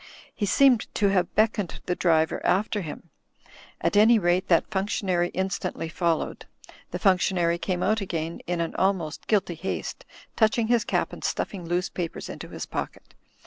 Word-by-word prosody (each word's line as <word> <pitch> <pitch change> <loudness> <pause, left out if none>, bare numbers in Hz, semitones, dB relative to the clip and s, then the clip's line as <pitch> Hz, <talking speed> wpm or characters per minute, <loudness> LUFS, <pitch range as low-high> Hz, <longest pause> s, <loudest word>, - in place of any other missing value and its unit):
He 205 - -2
seemed 255 +3 +4
to 200 -2 +3
have 185 -3 0
beckoned 215 -4 +1
the 180 - 0
driver 160 -3 +1
after 205 +2 +1
him; 165 0 -8 0.7
at - - 0
any 220 +3 +7
rate 180 -1 +1
that 170 - +4
functionary 190 -3 0
instantly 190 -3 -2
followed. 165 0 -1 0.4
The - - -4
functionary 180 -3 +2
came 180 -1 -1
out 215 +2 +2
again 165 -3 -3
in 175 -1 -1
an 165 - -2
almost 185 -5 -1
guilty 200 -5 +1
haste, 180 +4 -5 0.3
touching 220 0 +2
his 240 -2 +3
cap - - 0
and - - -9
stuffing 180 -4 -3
loose 175 +2 0
papers 170 -3 -5
into - - -7
his - - -6
pocket. - - -6
185 Hz, 160 wpm, -26 LUFS, 170-205 Hz, 0.7 s, any